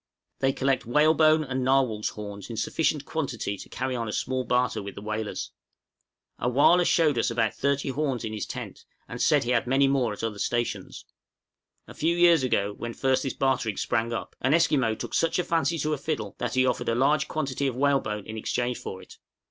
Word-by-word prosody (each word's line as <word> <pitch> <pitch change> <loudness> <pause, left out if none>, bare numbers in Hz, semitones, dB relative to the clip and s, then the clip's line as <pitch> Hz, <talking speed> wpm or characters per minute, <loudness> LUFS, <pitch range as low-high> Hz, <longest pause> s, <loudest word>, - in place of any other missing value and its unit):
They 135 0 +2
collect 135 -2 0
whalebone 155 +3 +4
and 130 -2 -3
narwhal's 130 -5 +2
horns 100 -1 -8
in 115 - -6
sufficient 150 +5 0
quantity 130 -11 -3
to - - -11
carry 130 0 -3
on 115 -2 -3
a - - -3
small 130 +3 -1
barter 125 0 0
with 100 0 -8
the - - -8
whalers. 110 0 -4 0.9
A 120 - 0
wăh 140 +7 +5
lah - - +3
showed 155 -7 +3
us - - +1
about 115 -2 0
thirty 140 0 0
horns 135 -3 -2
in 110 - -4
his 105 - -4
tent, - - -7 0.2
and - - -6
said - - +4
he 120 - -1
had 120 -1 +1
many 135 +2 +3
more 135 -4 +1
at 105 - -7
other 110 -2 -3
stations. 120 +2 -2 0.8
A - - -10
few 170 +2 0
years 170 -3 +6
ago, 105 -5 0
when 115 +2 -6
first 130 -1 +1
this 135 - -3
bartering 130 -6 0
sprang 115 +1 0
up, 115 - -5
an 130 +4 +3
Esquimaux 135 -9 +2
took - - -7
such 165 - +1
a 180 - +1
fancy 165 0 0
to 155 0 -1
a 150 - -3
fiddle 140 -9 -3
that 120 0 -2
he 130 0 +4
offered 125 - 0
a 115 - +1
large 140 +5 +2
quantity 140 -3 -2
of 130 - -2
whalebone 130 -7 0
in 110 0 -7
exchange 120 +2 -2
for 95 - -7
it. - - -16
130 Hz, 210 wpm, -26 LUFS, 115-140 Hz, 0.9 s, years